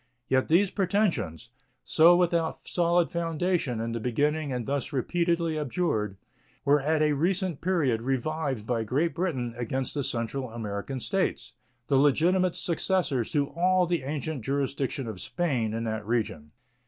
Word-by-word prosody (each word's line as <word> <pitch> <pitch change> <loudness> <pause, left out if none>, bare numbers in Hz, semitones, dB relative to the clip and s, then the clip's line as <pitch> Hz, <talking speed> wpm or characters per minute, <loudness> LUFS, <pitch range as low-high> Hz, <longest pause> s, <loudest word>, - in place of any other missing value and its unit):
Yet 130 0 +2
these 185 +4 +3
pretensions, 170 - 0 0.4
so 165 +2 +6
without 170 -2 0
solid 175 0 +2
foundation 170 -6 -1
in 115 +1 -2
the 115 - -2
beginning 145 +5 0
and 125 -2 -2
thus 140 0 -2
repeatedly 170 +3 0
abjured, 120 - -1 0.5
were 145 0 +4
at 155 +2 +2
a 150 -1 +3
recent 175 +2 0
period 150 -11 +1
revived 135 -1 -2
by 115 -1 0
Great 145 +10 0
Britain 140 -10 -2
against 125 +2 -2
the 145 - -1
Central 125 +2 -3
American 110 +3 -4
States, 195 - -1 0.3
the 135 - +2
legitimate 170 +6 +3
successors 170 - 0
to 145 -2 +1
all 180 +1 +2
the 170 -2 0
ancient 145 -1 -4
jurisdiction 135 0 -1
of 110 -5 -6
Spain 130 -11 -1
in 115 +1 -3
that 110 -1 -3
region. 105 -9 -2
145 Hz, 145 wpm, -27 LUFS, 120-170 Hz, 0.5 s, so